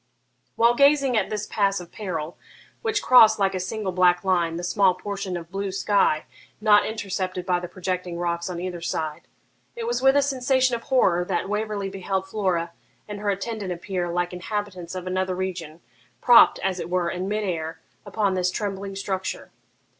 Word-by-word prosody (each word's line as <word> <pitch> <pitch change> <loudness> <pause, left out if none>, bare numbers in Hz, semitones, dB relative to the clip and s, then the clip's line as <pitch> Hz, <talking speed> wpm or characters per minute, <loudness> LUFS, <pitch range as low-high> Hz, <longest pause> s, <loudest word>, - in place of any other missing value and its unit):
While 235 +1 +4
gazing 280 -1 +4
at 210 -3 +1
this 210 -1 -3
pass 200 -2 0
of 175 -1 -11
peril, 175 -7 -5 0.5
which 435 -2 -1
crossed, 225 -4 +7
like 195 -1 +1
a 185 - -2
single 190 +1 -3
black 180 0 +3
line, 175 -3 +1
the 175 - -5
small 185 +1 +3
portion 195 -1 -4
of 170 0 -10
blue 195 0 -3
sky 195 -5 +1 0.3
not 210 -1 +5
intercepted 190 -4 -3
by 180 -1 +1
the 175 - -6
projecting 180 -1 -4
rocks 170 0 -2
on 175 -1 -4
either 180 -1 -5
side, 155 -2 -4 0.5
it 470 -1 -4
was 475 +1 -1
with 270 +1 +5
a 285 - +4
sensation 260 -1 +1
of 230 - -5
horror 190 -10 +3
that 180 0 -1
Waverley 210 -1 -2
beheld 190 0 -3
Flora 185 -5 -1 0.4
and 205 -1 -6
her 205 0 -2
attendant 200 0 -3
appear, 175 0 -3
like 175 +1 -1
inhabitants 185 -2 -5
of 185 -1 -5
another 185 0 -1
region, 175 -4 -5 0.4
propped, 240 -2 +7
as 190 -1 -1
it - - -5
were, 180 -1 0
in 185 +1 -3
mid 210 +1 -1
air, 165 -4 -3 0.2
upon 205 -3 0
this 180 -1 +1
trembling 195 0 -4
structure. 190 -1 -4
190 Hz, 180 wpm, -24 LUFS, 180-210 Hz, 0.5 s, crossed